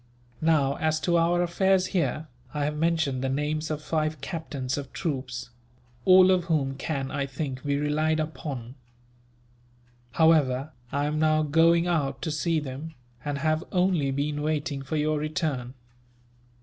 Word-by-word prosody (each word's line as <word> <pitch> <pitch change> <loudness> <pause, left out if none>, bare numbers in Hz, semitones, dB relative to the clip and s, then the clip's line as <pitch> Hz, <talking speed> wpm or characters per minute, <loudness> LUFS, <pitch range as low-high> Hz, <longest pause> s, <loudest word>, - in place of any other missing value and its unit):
Now, 150 -4 +2
as 155 0 +1
to 175 - +1
our 170 +1 +3
affairs 185 +2 +2
here, 160 -3 0 0.3
I 145 -1 0
have 150 +1 -2
mentioned 160 -5 +1
the 135 - 0
names 150 +3 -1
of 155 -1 -3
five 155 -1 -1
captains 140 -4 -4
of 140 -2 -6
troops; 130 -7 -4 0.5
all 185 0 +7
of 180 -2 +2
whom 145 -6 0
can, 135 0 -3
I 140 -2 -2
think, 135 -1 -5
be 140 -1 0
relied 155 +2 +1
upon. 140 -6 -5 1.4
However, 155 -4 +3 0.2
I 145 +1 0
am 150 +1 -1
now 155 0 +3
going 165 +3 +4
out 145 -6 0
to 160 - -1
see 160 +2 0
them, 150 +3 -7 0.3
and 145 -1 -2
have 155 +3 0
only 180 -6 +2
been 145 +2 -1
waiting 150 -2 -1
for 135 +3 -4
your 155 0 +1
return. 150 -5 -2
155 Hz, 150 wpm, -27 LUFS, 140-165 Hz, 1.4 s, all